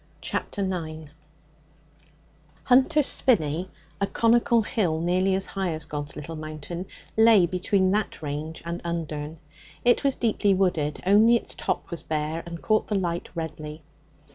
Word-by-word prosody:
Chapter 200 - -3
9 160 -5 -4 1.5
Hunter's 270 +4 +4
Spinney, 175 - +2 0.3
a 200 - +2
conical 235 +1 +3
hill 180 -8 0
nearly 185 +3 +1
as 190 - 0
high 190 -4 -2
as 155 0 -6
God's 150 -1 -5
Little 150 +2 -7
Mountain, 155 +3 -6 0.3
lay 220 -4 +6
between 185 +2 +1
that 210 +1 -1
range 150 +2 -5
and 170 +1 -4
Undern. 160 -2 -4 0.5
It 245 +3 +4
was 275 -1 +3
deeply 210 -4 +2
wooded; 165 -6 0
only 215 +5 +6
its 235 - -1
top - - -3
was 170 - -3
bare 155 +1 -2
and 170 -1 -8
caught 215 0 +2
the 210 - -1
light 175 -2 -2
redly. 155 -1 -6
175 Hz, 140 wpm, -25 LUFS, 155-205 Hz, 1.5 s, lay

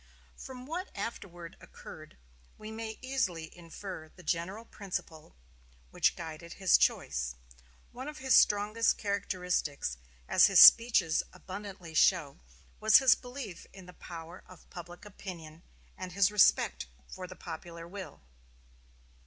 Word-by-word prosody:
From 255 -1 -10
what 350 +6 -5
afterward 175 -5 -7
occurred, - - -13 0.4
we 215 0 -9
may 220 0 -6
easily 185 -12 -2
infer 170 -1 -9
the 180 - -17
general 185 +7 -3
principle 180 - -7 0.6
which - - +2
guided 165 0 -8
his 190 -2 +3
choice. - - 0 0.6
One 255 +3 -8
of 300 0 -7
his 265 -2 +3
strongest 210 +2 +3
characteristics, 180 - -2 0.3
as - - +6
his - - +5
speeches 225 -9 +7
abundantly 190 -3 -9
show, 150 - +2 0.4
was 220 0 +7
his 265 -3 +6
belief 245 -8 -8
in 190 -2 -12
the 180 - -13
power 170 +1 -10
of 185 -2 -16
public 175 +2 -10
opinion, 170 -6 -10 0.3
and 185 -2 -7
his 200 +1 +3
respect 205 - +3 0.2
for 185 -1 -8
the 185 - -11
popular 170 0 -9
will. 185 - -9
185 Hz, 130 wpm, -31 LUFS, 165-215 Hz, 0.6 s, speeches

